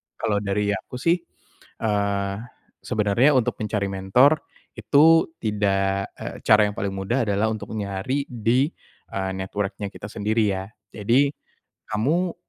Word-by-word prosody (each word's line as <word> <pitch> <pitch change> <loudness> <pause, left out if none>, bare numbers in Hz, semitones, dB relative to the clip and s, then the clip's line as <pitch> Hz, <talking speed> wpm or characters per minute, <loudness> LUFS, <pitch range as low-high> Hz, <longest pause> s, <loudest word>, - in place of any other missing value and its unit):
Kalau 105 -3 0
dari 105 0 0
aku 100 +5 -5
sih, 165 +8 +2 0.6
eee, 100 -2 0 0.4
sebenarnya 115 +5 +2
untuk 125 - +1
mencari 105 -2 -1
mentor 125 +11 +4 0.4
itu 150 +9 +5 0.2
tidak, 100 -2 0
eee, - - -7
cara 105 -1 +7
yang 105 - -8
paling 100 -1 -2
mudah 110 +6 -1
adalah 105 +2 +1
untuk 110 0 -6
nyari 105 +7 -2
di, 125 +5 +1 0.4
eee, 95 -1 -2
network-nya 100 +2 -3
kita 100 - -9
sendiri 105 +1 0
ya. 95 0 -3 0.3
Jadi 120 +7 +3 0.6
kamu 155 +12 0
105 Hz, 130 wpm, -24 LUFS, 100-125 Hz, 0.6 s, cara